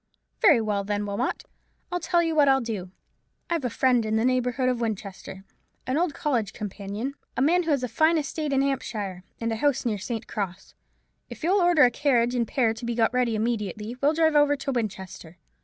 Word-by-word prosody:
Very 330 - +6
well, 205 -2 -1
then, 205 +1 -2
Wilmot, 200 0 -2 0.5
I'll 355 - -1
tell 345 -1 +2
you 330 -1 0
what 295 -2 +4
I'll 270 0 +5
do. 215 -7 -4 0.6
I've 335 -4 0
a 250 - 0
friend 250 0 +2
in 215 0 -1
the 220 +2 +2
neighbourhood 255 0 +1
of 250 -2 0
Winchester, 195 -3 -5 0.4
an 260 +1 -1
old 330 -1 0
college 240 -11 -1
companion, 210 +5 -5 0.2
a - - +1
man 345 +5 +4
who 335 - -4
has 280 -4 +1
a - - 0
fine 315 +8 +3
estate 305 0 -2
in 270 0 +2
Hampshire, 210 -9 -3 0.2
and 230 0 -2
a 225 - -2
house 275 +1 +1
near 215 -4 -1
St. 225 +3 -4
Cross. 195 -4 -5 0.6
If - - -10
you'll 375 +4 +3
order 345 -3 +5
a 245 - +5
carriage 245 -3 +2
and 235 -2 0
pair 230 -2 +1
to 225 +2 -11
be 235 0 -2
got 225 +1 +2
ready 245 -3 +1
immediately, 215 0 -2
we'll 290 +2 +3
drive 320 -1 +3
over 290 0 +5
to 275 0 -4
Winchester. 190 -7 -5
245 Hz, 205 wpm, -26 LUFS, 215-285 Hz, 0.6 s, Very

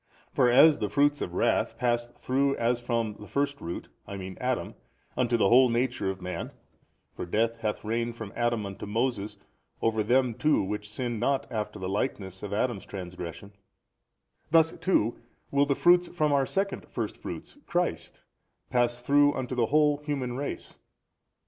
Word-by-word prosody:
For 125 - +4
as 150 +5 +7
the 105 - -1
[fruits] 145 +7 +2
of 90 - -4
wrath - - +1
passed 120 -1 -1
through 135 +2 +1
as 120 +1 0
from 115 -3 -1
the 105 - -10
first 140 0 -1
root, 85 +1 -5 0.2
I 100 - -6
mean 95 -1 -7
Adam, - - -1 0.4
unto 120 -1 +2
the 105 - +3
whole 125 +1 +7
nature 120 -3 0
of 95 -1 -5
man 90 - -5 0.6
(for - - -5
death 115 +6 0
hath 110 -2 -3
reigned 115 +1 -1
from 110 -3 -8
Adam 120 -3 0
unto 100 +1 -7
Moses 110 -2 -1 0.4
over 110 -1 +1
them 125 +2 +3
too 150 +3 +2
which 105 +2 -4
sinned 120 0 -3
not 135 +3 +1
after 105 -2 -3
the 95 -2 -4
likeness 95 -2 -3
of 105 - -6
Adam's 110 0 -1
transgression): 90 +1 -7 1.0
thus 160 0 +5
too 120 - 0 0.3
will 140 0 +3
the 140 - +2
[fruits] 175 +3 +5
from 155 -4 0
our 135 -2 +2
second 195 0 -2
first - - -3
fruits, - - -8
Christ, 175 0 -2 0.5
pass 120 -1 +1
through 145 +2 +4
unto 130 -1 -3
the 120 -3 +1
whole 150 +1 +3
human 140 -4 -3
race. 140 +2 -5
120 Hz, 170 wpm, -28 LUFS, 105-140 Hz, 1.0 s, as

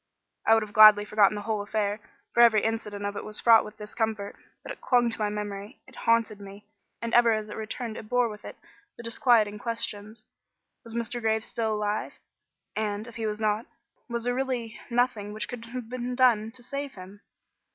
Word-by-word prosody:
I 225 - +7
would 225 - +2
have 210 -1 -10
gladly 215 -1 +8
forgotten 210 -1 +3
the 205 - -5
whole 215 -2 -1
affair, 205 0 -1 0.3
for 235 - +4
every 225 -3 +6
incident 210 -2 -3
of 205 0 -3
it - - -5
was 215 0 -2
fraught 230 -2 +6
with 210 0 -11
discomfort. 210 -1 -3 0.3
But - - -7
it - - -9
clung 240 -2 +3
to 225 - -2
my 210 -1 0
memory; 205 +2 -6
it 260 - -17
haunted 230 -2 +1
me; 200 +1 -11 0.4
and 230 - -3
ever 235 -1 +6
as 215 -1 -3
it - - -7
returned 220 +1 -5
it 215 - -9
bore 245 -1 +3
with 210 -2 -9
it - - -9 0.4
the 235 - -9
disquieting 230 -3 +2
questions: 215 -1 -4 0.6
Was 230 -1 -9
Mr. 235 +1 -3
Graves 220 -1 +1
still 225 -3 -1
alive? 210 0 -2 0.6
And, 210 0 -2
if 235 - -10
he 225 -1 -2
was 210 0 -3
not, 215 +1 0 0.4
was 235 -1 -3
there 245 +1 0
really 250 -3 -3
nothing 235 -4 0
which 215 - -4
could 245 -2 -7
have 240 0 -7
been 250 +1 -4
done 235 -4 +3
to 250 -1 -9
save 280 +2 -5
him? 190 +2 -12
220 Hz, 205 wpm, -27 LUFS, 210-235 Hz, 0.6 s, gladly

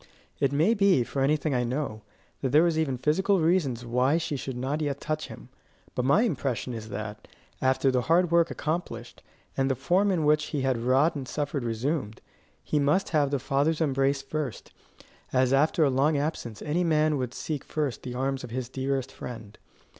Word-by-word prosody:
It 140 - +2
may 155 +10 +3
be, 200 - +4
for 135 +3 -3
anything 150 +2 +1
I 125 -1 +1
know, 120 -3 -3 0.4
that 135 - 0
there 150 +5 +5
were - - +4
even 155 -5 0
physical 185 +9 +2
reasons 155 -8 +1
why 125 +6 +2
she 165 -2 -2
should 130 -2 -5
not 135 +5 -2
yet 140 -2 -2
touch 155 0 -3
him; - - -11 0.4
but 125 - -1
my 140 - +4
impression 135 - -2
is 110 -1 -7
that, 105 0 -6 0.3
after 130 +1 +2
the 125 -1 +1
hard 170 +5 +2
work 170 0 +4
accomplished, 150 -8 -4 0.3
and 135 0 +1
the 135 - +1
form 180 +10 +2
in 170 -5 +1
which 150 0 +3
he 145 -2 -3
had 130 -2 +1
wrought 130 +7 +3
and 135 -3 -5
suffered 145 -1 -2
resumed, 115 0 -2 0.4
he 150 - 0
must 150 +7 +2
have 150 -3 +2
the 140 - 0
Father's 140 +5 0
embrace 135 -2 +1
first, 140 -4 -5 0.6
as 130 0 +2
after 155 +4 +3
a 140 - +3
long 140 +4 +2
absence 140 -7 -3
any 165 +4 0
man 155 -2 +2
would 125 -1 -3
seek 150 -4 -4
first 150 -5 -3
the 125 -1 -6
arms 135 +1 -1
of 125 - -7
his 125 +1 -4
dearest 135 0 -2
friend. 110 -4 -9
140 Hz, 190 wpm, -27 LUFS, 130-155 Hz, 0.6 s, there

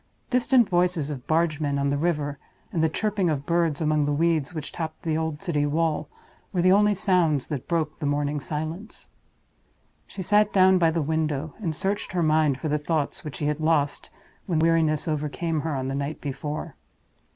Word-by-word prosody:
Distant 250 -2 +4
voices 175 -4 +1
of 130 -4 -7
bargemen 155 -3 +1
on 140 0 +1
the - - +1
river, 145 -3 -1 0.3
and 160 - +1
the 160 - +3
chirping 200 +1 0
of 145 -3 -2
birds 170 -3 +1
among 155 -1 +2
the 145 - 0
weeds 160 -1 +1
which 155 -4 -6
topped 160 -2 -6
the 160 -2 0
old 160 0 -3
city 160 -6 0
wall, 155 +1 0 0.4
were 180 -4 0
the 185 - +5
only 205 +1 +4
sounds 175 -8 +2
that 145 -5 -4
broke 160 -3 -1
the 150 - -2
morning 145 0 0
silence. 160 +8 -6 1.0
She 190 - -6
sat 210 +2 +3
down 185 -1 +5
by 165 -2 +4
the 160 -1 0
window; 155 -1 -1
and 165 -7 -2
searched 195 +3 -2
her 175 -2 +1
mind 155 -3 +2
for 160 - -3
the 150 0 0
thoughts 150 -1 -2
which 150 -2 -6
she 150 - -3
had 150 +1 0
lost, 155 -2 0 0.4
when 170 -4 0
weariness 160 -2 +2
overcame 155 +1 -1
her 160 -2 -2
on 130 -1 -2
the 135 - -2
night 140 +2 -3
before. 145 +2 -5
155 Hz, 190 wpm, -25 LUFS, 145-170 Hz, 1.0 s, the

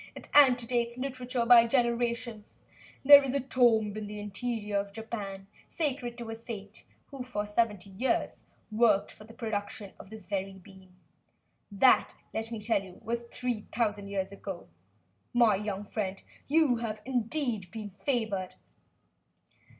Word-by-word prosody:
It - - -11
antedates 245 -3 +4
literature 255 -2 -2
by 235 -1 +8
generations. 235 -2 -1 0.4
There 285 0 +11
is 270 0 -2
a - - +2
tomb 235 -5 +2
in 215 -1 -5
the 210 0 -7
interior 210 0 -3
of 200 0 -5
Japan, 205 -3 -6 0.2
sacred 255 -6 -2
to 235 -2 -6
a - - -4
saint 220 -3 -9 0.3
who 275 -2 -7
for 245 -5 -3
seventy 210 -3 -1
years 235 +8 -1 0.3
worked 215 -2 +3
for 215 - -13
the 225 - -14
production 215 -2 -4
of - - -12
this 220 -3 -10
very 195 0 -3
bean. 190 -1 -16 0.8
That, 245 +6 +4 0.2
let 225 0 -3
me 225 - -4
tell 210 -1 +1
you, 185 -2 -13
was 235 +1 -2
three 245 -4 -3
thousand 210 -3 -1
years 195 -1 -3
ago. 195 -2 -7 0.7
My 235 -4 +5
young 205 0 -4
friend, 200 -2 -3 0.3
you 295 -4 +4
have 220 -2 -5
indeed 245 - 0
been 210 0 -7
favored!" 205 -4 -2
225 Hz, 145 wpm, -29 LUFS, 205-245 Hz, 0.8 s, There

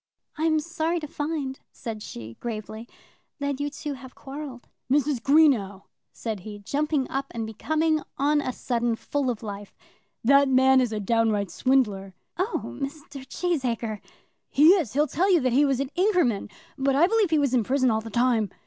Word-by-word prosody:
"I'm 315 0 +2
sorry 330 +2 -1
to 305 - -6
find," 290 -3 -3
said 225 -3 -6
she, 115 - -8
gravely, 220 0 -6 0.5
"that 285 -2 -2
you 290 0 -1
two 290 0 -5
have 260 -1 -11
quarrelled." 270 -3 -8 0.2
"Mrs. 285 -3 +2
Greenow," 250 -10 +3 0.3
said 220 -3 -4
he, 205 +3 -8
jumping 285 +6 -1
up, 275 +1 -2
and 230 -1 -4
becoming 310 +8 0 0.2
on 295 +2 +2
a 255 - -2
sudden 240 -2 -1
full 280 +3 -2
of 235 -2 -3
life, 205 -1 -8 0.5
"that 275 +3 +5
man 265 0 +5
is 245 -3 0
a 215 - -2
downright 210 -2 +1
swindler." 205 -7 +1 0.2
"Oh, 380 +6 -1 0.2
Mr. 280 -1 -6
Cheesacre." 245 - -2 0.5
"He 300 +4 +6
is. 345 - +3
He'll 295 +3 +3
tell 370 +6 +1
you 350 - +5
that 255 -2 +1
he 285 +3 +5
was 270 -2 +1
at 275 -1 -2
Inkerman, 350 - +1 0.3
but 270 0 +2
I 305 +5 +6
believe 430 -1 +2
he 315 - +3
was 280 -3 +1
in 245 -3 +3
prison 260 +2 +2
all 220 0 0
the 225 - -8
time." 235 -2 +2
265 Hz, 175 wpm, -25 LUFS, 225-300 Hz, 0.5 s, He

